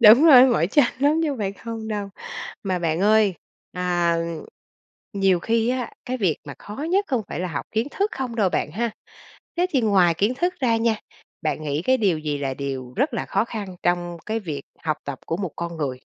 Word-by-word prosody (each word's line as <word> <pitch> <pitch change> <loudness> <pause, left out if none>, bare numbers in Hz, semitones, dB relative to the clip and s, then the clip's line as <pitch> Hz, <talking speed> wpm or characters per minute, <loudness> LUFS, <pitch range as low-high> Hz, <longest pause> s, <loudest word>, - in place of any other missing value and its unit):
Đúng 235 +7 +9
rồi 310 -5 +9
đấy, - - +8
mỏi 230 -9 +3
chân 280 +7 +4
lắm 295 +4 +3
chứ 315 - +1
không 270 - -4
phải 195 -2 -1
không 225 +2 -6
đâu. 205 -2 -3 0.5
Mà 185 -3 -1
bạn 165 -1 0
ơi, 210 -1 +4 0.4
à, 175 -2 +1 1.0
nhiều 195 -3 +3
khi 230 +2 +1
á, 255 -2 -2
cái 255 +1 -2
việc 185 - +1
mà 140 -2 -7
khó 210 - -9
nhất 400 +2 +3
không 250 -6 +1
phải - - -4
là 180 - -2
học 145 -4 -4
kiến 225 +5 0
thức 405 +2 0
không 255 -3 -4
đâu 205 -4 +3
bạn 150 - -1
ha, 230 +3 -1 0.7
thế 355 +1 +3
thì 265 - +2
ngoài 190 -6 +4
kiến 205 +9 +1
thức 355 +6 0
ra 230 -3 +3
nha, 225 -1 +2 0.5
bạn 155 0 -1
nghĩ 150 +1 -1
cái 260 +4 +3
điều 195 -9 +2
gì 150 -2 -2
là 135 -2 -2
điều 130 -3 -5
rất 275 +2 +1
là - - -2
khó 200 +3 +1
khăn 200 -6 -6
trong 175 -1 0
cái 220 +1 -1
việc 150 -7 -5 0.2
học 155 -1 +1
tập 140 -2 -5
của 165 - -1
một 185 -2 -3
con 170 -1 -4
người? 135 -4 -3
200 Hz, 225 wpm, -23 LUFS, 170-235 Hz, 1.0 s, Đúng